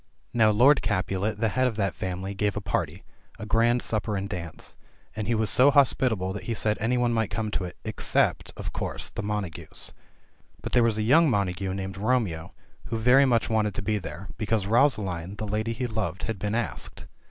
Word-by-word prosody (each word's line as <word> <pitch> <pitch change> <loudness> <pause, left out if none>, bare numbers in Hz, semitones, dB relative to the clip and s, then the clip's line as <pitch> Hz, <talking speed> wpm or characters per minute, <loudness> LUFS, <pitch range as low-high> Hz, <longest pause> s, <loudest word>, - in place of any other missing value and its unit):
Now 110 -2 +5
Lord 125 +7 +5
Capulet, 95 +3 -1
the 110 - +2
head 130 +5 +2
of 120 - -2
that 100 -4 0
family, 95 +1 -4
gave 100 0 -1
a - - 0
party - - -2 0.2
— - - -28
^a 105 - -6
grand 120 +3 +3
supper 110 -1 -1
and 95 +1 -3
dance 85 -4 -7 0.2
— - - -34
and 110 -1 -3
he 120 - +2
was 110 -1 0
so 130 +3 +6
hospitable 120 -8 +2
that 100 -2 -7
he 115 - -2
said 105 0 0
any 115 +4 +1
one 120 -1 +2
might 115 -3 0
come 105 +1 -3
to 90 - -2
it 90 - -9
— - - -37
except - - +1
(of - - -5
course) - - -3
the - - -4
Montagues. 105 -5 -5 0.7
But - - -6
there 120 - +4
was 115 -2 +2
a 110 - 0
young 155 +8 +5
Montagu 95 -3 -1
named 95 0 -5
Romeo, 105 -8 0 0.3
who 115 - -3
very 125 +5 +5
much 120 -3 +2
wanted 110 -3 0
to - - -3
be 105 +1 0
there, 95 0 -8
because 110 -2 0
Rosaline, 100 - +1
the 105 - -4
lady 105 +2 -1
he 125 +2 -3
loved, 110 -7 -3
had 110 -4 -3
been 105 +2 -2
asked. 120 -1 -4
105 Hz, 215 wpm, -26 LUFS, 95-115 Hz, 0.7 s, so